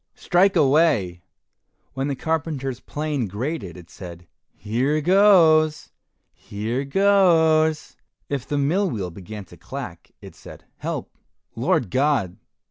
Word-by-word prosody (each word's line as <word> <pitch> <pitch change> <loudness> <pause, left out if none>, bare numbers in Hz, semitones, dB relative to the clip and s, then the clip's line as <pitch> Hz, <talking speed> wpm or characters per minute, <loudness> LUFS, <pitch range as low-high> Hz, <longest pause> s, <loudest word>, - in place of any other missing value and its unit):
strike 190 +2 +2
away." 135 - +2 0.7
When 135 +1 -2
the 140 - -2
carpenter's 145 -4 -3
plane 145 -6 -3
grated, 105 - -5
it 85 -1 -14
said, 90 -2 -10 0.3
"Here 125 - -1
goes! 165 -3 +4 0.4
here 115 +6 -4
goes." 160 -3 +3 0.3
If 140 -3 -4
the 145 - -2
mill 175 +8 +1
wheel 95 - -4
began 100 +3 -9
to - - -16
clack, - - -9
it - - -12
said, - - -14
"Help, - - -5 0.4
Lord 105 -8 0
God! 130 -10 0
140 Hz, 120 wpm, -22 LUFS, 105-160 Hz, 0.7 s, goes